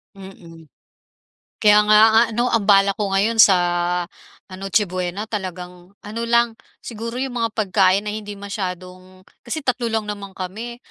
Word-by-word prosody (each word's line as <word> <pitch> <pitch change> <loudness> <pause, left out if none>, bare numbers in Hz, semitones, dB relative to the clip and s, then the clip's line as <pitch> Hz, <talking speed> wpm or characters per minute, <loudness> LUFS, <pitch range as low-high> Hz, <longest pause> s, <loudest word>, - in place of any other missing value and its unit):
Mm. 170 -4 -14 0.9
Kaya 210 0 +5
nga 215 0 +6
a 225 - +6
ano 240 +2 0
ang 215 -3 0
balak 195 0 +4
ko 205 - 0
ngayon 220 +3 +2
sa, 195 -3 +7 0.9
ah, 185 - -11
Noche 195 +2 +1
Buena 185 +2 -4
talagang 180 -2 -8
ano 215 +3 -6
lang 235 0 +3 0.3
siguro 230 +1 -6
yung 260 0 -3
mga 230 - +1
pagkain 195 -1 +2
na 210 - -4
hindi 210 -1 -7
masyadong 185 -2 -7 0.2
kasi 300 +5 -6
3 245 -2 -1
lang 220 -1 -2
naman 200 -2 -8
kami, 220 +6 -6
205 Hz, 155 wpm, -20 LUFS, 185-225 Hz, 0.9 s, sa